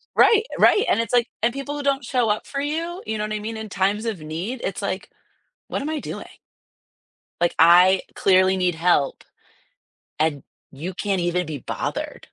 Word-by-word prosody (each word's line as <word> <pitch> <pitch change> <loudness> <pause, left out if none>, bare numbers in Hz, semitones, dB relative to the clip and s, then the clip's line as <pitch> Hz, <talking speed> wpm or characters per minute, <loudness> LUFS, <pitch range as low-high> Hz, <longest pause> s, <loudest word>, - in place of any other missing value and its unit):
Right, 445 -1 +6
right, 420 +4 +5
and - - +3
it's, 230 +1 -2
like 240 -1 +4 0.2
and 235 +1 +2
people 275 +1 -5
who 290 - -4
don't 275 -2 +1
show 245 -3 0
up 210 - -1
for 275 - -4
you, 330 +5 -3
you 220 0 -3
know 210 - -2
what 215 - -4
I 210 - -2
mean, 220 +1 -5
in 220 -1 -7
times 200 +4 0
of 215 -7 -3
need, 175 +11 -5
it's, - - -3
like, - - -3 0.6
what - - -3
am 305 - -3
I 310 -2 -2
doing? - - -7 1.2
Like 175 - +2
I 180 +3 +7
clearly 190 0 +4
need 180 -2 +1
help, 160 -4 +1 1.0
and 155 -3 0 0.3
you 165 +7 -6
can't 195 -1 -1
even 175 0 0
be 150 -3 -5
bothered. - - -4
210 Hz, 190 wpm, -23 LUFS, 180-255 Hz, 1.2 s, I